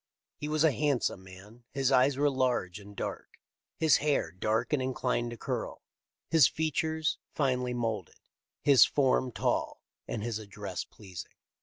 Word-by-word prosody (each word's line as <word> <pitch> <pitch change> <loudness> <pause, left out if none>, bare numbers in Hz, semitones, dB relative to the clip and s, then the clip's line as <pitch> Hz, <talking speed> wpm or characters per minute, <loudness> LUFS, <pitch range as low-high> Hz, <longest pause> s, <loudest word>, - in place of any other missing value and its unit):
He 150 - -4
was 155 0 +1
a 160 - +5
handsome 140 -9 0
man. 100 +6 -14
His 135 -1 +2
eyes 135 +1 +4
were 145 +1 +3
large 125 -8 0
and 100 0 -13
dark, - - -6 0.4
his 160 -2 +5
hair 150 -1 0
dark 110 +8 -1
and 145 - +2
inclined 125 -2 -1
to 120 - -7
curl, - - -4 0.5
his 160 -6 +7
features 160 0 -1 0.2
finely 125 -3 0
moulded, 110 -6 -3 0.4
his 135 -6 +8
form 130 -2 +2
tall, - - -1 0.2
and 105 - -3
his 115 -2 -2
address 100 -3 -6
pleasing." 95 -5 -10
125 Hz, 150 wpm, -30 LUFS, 105-145 Hz, 0.5 s, his